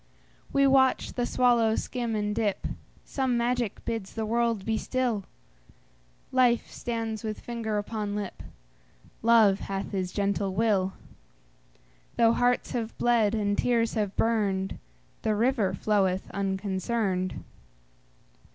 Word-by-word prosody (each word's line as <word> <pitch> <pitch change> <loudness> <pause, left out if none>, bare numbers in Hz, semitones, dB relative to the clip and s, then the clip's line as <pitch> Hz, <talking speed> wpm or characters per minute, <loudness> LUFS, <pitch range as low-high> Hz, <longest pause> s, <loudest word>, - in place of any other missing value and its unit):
We 275 0 +4
watch 265 -1 +3
the 245 -1 -1
swallow 235 -3 +3
skim 240 -3 -2
and 210 0 -1
dip; 210 -3 -1 0.4
Some 260 -3 0
magic 240 -2 -1
bids 225 -4 -4
the 220 -1 -2
world 230 -2 0
be 225 - 0
still; 240 -4 -1 1.1
Life 250 -2 +3
stands 225 -2 -4
with 215 -1 -4
finger 230 -3 -3
upon 205 0 -3
lip; 205 -2 -5 0.8
Love 220 -4 +5
hath 195 0 -4
his 185 -3 -2
gentle 200 -1 -1
will; 195 -3 +2 1.2
Though 230 0 +4
hearts 245 +1 +1
have 230 -3 -3
bled, 230 -3 +3
and 205 -2 0
tears 230 0 +1
have 205 -3 -1
burned, 200 -4 0 0.4
The 215 -1 +1
river 225 -3 +2
floweth 190 -2 0
unconcerned. 190 0 -1
220 Hz, 120 wpm, -27 LUFS, 200-235 Hz, 1.2 s, Love